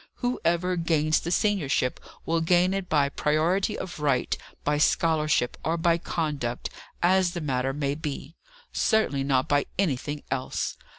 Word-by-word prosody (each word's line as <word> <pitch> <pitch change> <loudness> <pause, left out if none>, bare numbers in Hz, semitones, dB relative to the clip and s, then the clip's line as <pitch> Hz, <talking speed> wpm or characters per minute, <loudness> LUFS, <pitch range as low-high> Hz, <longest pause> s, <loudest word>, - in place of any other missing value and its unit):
Whoever 180 -7 0
gains 155 -2 +2
the 170 - -5
seniorship 170 -10 +1 0.3
will 165 0 +1
gain 175 +3 +3
it 195 -2 -3
by 145 -3 +3
priority 170 +9 +1
of 180 - -6
right, 140 -4 +1 0.3
by 150 0 +1
scholarship, 155 -5 +2
or 165 +1 0
by 170 0 +2
conduct 145 -8 -3 0.3
as 185 0 +3
the 175 - -3
matter 135 -4 -1
may 140 0 -1
be. 150 +1 -6 0.4
Certainly 180 - +1
not 130 -2 +2
by 145 -1 +2
anything 150 -5 -1
else. 130 -1 -2
155 Hz, 140 wpm, -26 LUFS, 140-175 Hz, 0.4 s, gain